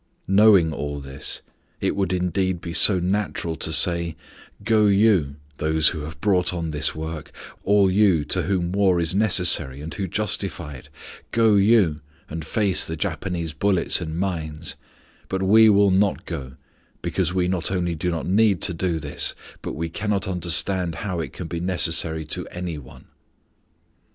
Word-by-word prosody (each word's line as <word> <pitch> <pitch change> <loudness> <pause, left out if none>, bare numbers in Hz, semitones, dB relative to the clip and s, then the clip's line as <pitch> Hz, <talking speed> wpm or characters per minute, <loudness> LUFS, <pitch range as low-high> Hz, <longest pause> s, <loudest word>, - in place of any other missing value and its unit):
Knowing 95 -4 +5
all 75 -1 -4
this, 70 -1 0 0.4
it - - -1
would 95 -1 -1
indeed 90 0 -1
be 85 -1 -7
so 95 +2 +5
natural 90 -2 -2
to 80 - -3
say, 85 0 +2 0.5
"Go 110 -1 +3
you, 100 -8 +3 0.2
those 80 0 +3
who 80 - -5
have 75 0 -8
brought 90 -1 +1
on 85 -2 -3
this 75 0 -1
work, 80 -1 -6 0.3
all 100 0 +4
you 95 -6 +3
to - - 0
whom 90 -3 -1
war 95 -2 +2
is 85 -1 0
necessary, 90 -9 +3
and 80 +3 -7
who 95 - -3
justify 95 -5 -2
it; 65 - -13 0.4
go 115 -2 +3
you, 100 -6 +4 0.3
and 80 +1 -5
face 100 -1 +1
the 80 - -4
Japanese 85 -1 -3
bullets 95 +2 +1
and 80 -1 -5
mines, 85 -4 -3 0.5
but 95 0 -2
we 110 +3 +6
will 100 -1 +4
not 100 +1 +1
go, 70 -7 -6 0.5
because 90 -3 -1
we 90 -1 0
not 90 -2 -1
only 90 -2 -1
do 85 +2 -2
not 85 -2 -3
need 100 0 +3
to 90 - +2
do 85 0 -1
this, 75 -2 -2 0.3
but - - -5
we 85 +2 -3
cannot 100 +2 -2
understand 90 -1 0
how 90 -4 -3
it 80 - -4
can 90 - -7
be 85 0 -4
necessary 85 -3 -1
to 75 - -3
any 90 -3 -6
one." 65 -1 -15
90 Hz, 165 wpm, -23 LUFS, 80-95 Hz, 0.5 s, we